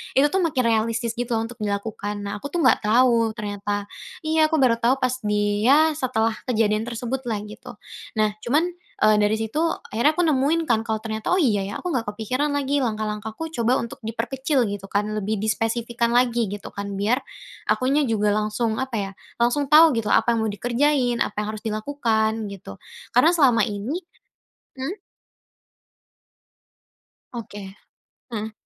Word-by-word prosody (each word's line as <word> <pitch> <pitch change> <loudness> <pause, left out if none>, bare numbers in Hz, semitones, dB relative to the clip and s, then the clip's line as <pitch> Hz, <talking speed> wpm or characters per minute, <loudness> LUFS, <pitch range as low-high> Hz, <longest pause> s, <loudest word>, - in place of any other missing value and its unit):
itu 270 - +5
tuh 385 - +1
makin 280 -7 +1
realistis, 230 0 +1
gitu 245 +1 -3
loh, 225 - 0
untuk 240 0 -12
dilakukan. 205 0 -3
Nah, 200 +1 -4
aku 285 - -5
tuh 345 - -1
nggak - - +5
tahu 230 -1 +4
ternyata. 205 -1 -3 0.4
Iya, 315 0 +3
aku 320 - 0
baru 235 -2 +4
tahu 240 +3 +3
pas 255 -1 +1 0.2
di 205 0 +1
ya 310 +3 +6
setelah 235 -5 0 0.2
kejadian 215 -3 +1
tersebut 240 +2 -3
lah, 220 -3 -1
gitu. 210 - -11 0.4
Nah, 210 -1 +2
cuman, 300 +8 +2 0.3
eee, 215 0 +5
dari 210 +1 +3
situ 225 +9 -1 0.3
akhirnya 235 +8 +3
aku 350 +3 0
nemuin 310 +3 +2
kan 225 -3 +2
kalau 220 -1 -2
ternyata, 220 -1 -4
oh, 365 - +3
iya, 215 - +2
ya, 200 - -5
aku - - -5
nggak 240 - 0
kepikiran 255 +8 -1
lagi 285 -1 0
langkah-langkah, 215 -1 -3
aku 325 +9 -5
coba 240 -4 +1
untuk 235 - -7
diperkecil 250 +3 -1 0.2
kan 205 +1 +1 0.2
lebih 215 +1 -1
dispesifikan 230 +2 -1
lagi, 240 -3 +2
gitu 205 0 -6
kan, 200 -1 -5
biar 240 +7 +1 0.5
akunya 275 +4 +2
juga 210 -4 +1
langsung, 215 +1 0
apa 260 +1 -3
ya, 195 -1 -3 0.3
langsung 265 +4 +1
tahu 310 -2 +8
gitu, 225 -2 -1
apa 235 - +3
yang 225 - 0
mau 220 - 0
dikerjain, 245 +2 +1
apa - - -6
yang 210 - -4
harus 215 - -10
dilakukan, 220 -2 -1
gitu, 175 - -9 0.4
karena 300 +7 +6
selama 260 -10 +4
ini 225 - -3 0.7
mhm? 310 +11 -4 2.3
Oke, 205 -5 -8 0.6
heeh. 220 -1 -4
230 Hz, 165 wpm, -23 LUFS, 215-265 Hz, 2.3 s, tahu